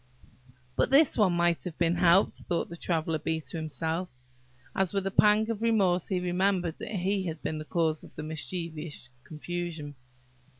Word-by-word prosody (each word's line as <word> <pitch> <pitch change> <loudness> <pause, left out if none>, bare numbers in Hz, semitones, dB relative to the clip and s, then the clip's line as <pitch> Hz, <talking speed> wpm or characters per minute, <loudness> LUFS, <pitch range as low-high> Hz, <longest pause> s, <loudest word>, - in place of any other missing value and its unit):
"But - - +2
this 275 +2 +5
one 200 -5 +3
might 170 -1 +2
have 180 -4 -6
been 170 0 +2
helped," 175 +2 +4
thought 175 - -2
the 170 - -7
Traveller 165 -2 -1
bee 160 +1 -1
to 160 - -6
himself, 160 +3 -3 0.7
as 190 -1 +1
with 195 -1 0
a 195 - -1
pang 210 +2 +4
of 220 -1 -4
remorse 195 -6 +2
he 185 -2 0
remembered 180 -1 0
that - - -6
he 190 +1 0
had 160 -2 -6
been 155 - -2
the 155 - -7
cause 160 -1 0
of - - -14
the 155 - -6
mischievous 160 -3 -4
confusion. 165 -2 -5
175 Hz, 175 wpm, -29 LUFS, 160-190 Hz, 0.7 s, this